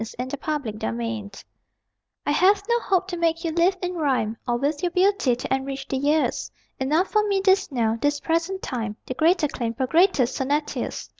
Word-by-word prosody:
TO 225 - -10
THE 260 +2 -6
ONLY 295 -7 -1
BEGETTER 220 +2 -4
I 210 -3 -6 0.8
I - - +1
have 390 +6 +4
no 475 0 +2
hope 375 -4 0
to 350 - -3
make 335 0 0
you 330 - -1
live 345 +3 +2
in 360 0 -1
rhyme 265 -9 0
Or 240 0 +1
with 285 +4 -1
your 355 - +1
beauty 370 -7 +2
to 245 - -3
enrich 270 0 -3
the - - -2
years 295 +3 +1 0.3
Enough 305 +8 +1
for 425 -1 +2
me 400 -1 +1
this 385 -3 +3
now, 230 -3 0
this 290 0 +1
present 335 +5 -1
time; 225 -4 -3
The - - -4
greater 320 +3 +3
claim 235 -4 -4
for 260 - 0
greater 330 +1 +4
sonneteers. 275 +4 -2
295 Hz, 200 wpm, -24 LUFS, 255-360 Hz, 0.8 s, have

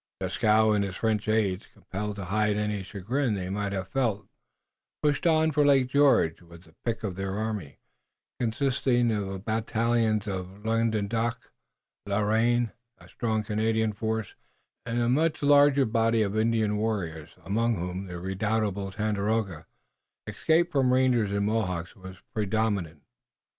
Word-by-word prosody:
Dieskau 110 0 +3
and 105 -1 +2
his 95 -2 -4
French 110 -1 -1
aides, 105 -3 0
compelled 105 +2 -6
to 100 -2 -6
hide 105 +2 +1
any 105 -1 -1
chagrin 110 +6 -2
they 95 -1 -4
may 100 0 -2
have 95 -2 -3
felt, 115 -5 -1 0.8
pushed 150 +3 +2
on 160 -1 +3
for 150 0 +3
Lake 135 -3 +4
George 140 - +3
with 85 0 -15
the 80 -3 -21
pick 115 -2 -2
of 100 -4 -3
their 95 +1 -3
army, 105 -9 -4 0.6
consisting 120 0 +1
of 105 -2 -1
the 95 0 -4
battalions 110 +1 0
of 95 +1 -6
Languedoc, 115 +1 -1 0.6
and 100 - -1
La 105 - +2
Reine, 115 +2 +2 0.3
a - - -17
strong 110 -2 -2
Canadian 110 +1 0
force, 110 -1 -3 0.5
and 115 +1 -1
a 120 - +1
much 155 +5 +1
larger 145 -1 +5
body 115 0 +2
of 100 0 -2
Indian 110 -1 +1
warriors, 85 -8 -3
among 115 +4 +1
whom 90 +1 -4
the 90 -1 -6
redoubtable 100 +1 -1
Tandakora, 105 -3 -1 0.6
escaped 165 +2 +1
from 135 -3 +2
rangers 125 -5 +2
and 100 0 0
Mohawks, 95 -5 -2
was 95 -2 -11 0.2
predominant. 100 -7 -1
110 Hz, 150 wpm, -27 LUFS, 100-115 Hz, 0.8 s, larger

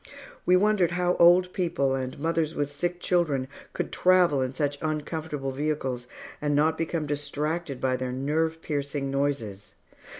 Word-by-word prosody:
We 180 - +6
wondered 190 -3 +3
how 180 0 +1
old 180 +1 +6
people 165 -7 0
and 130 -1 -3
mothers 160 +1 0
with 145 -1 -1
sick 175 +4 -2
children 150 -8 +1 0.3
could - - -3
travel 180 -6 +4
in 130 -1 -1
such 145 0 -1
uncomfortable 155 -2 -3
vehicles 135 -3 -2 0.3
and 145 -1 +1
not 155 +2 +3
become 165 -1 -2
distracted 145 0 -2
by 130 -1 +1
their 130 0 -3
nerve 160 +5 -1
piercing 140 -2 -2
noises. 115 -8 -2
150 Hz, 145 wpm, -27 LUFS, 135-170 Hz, 0.3 s, We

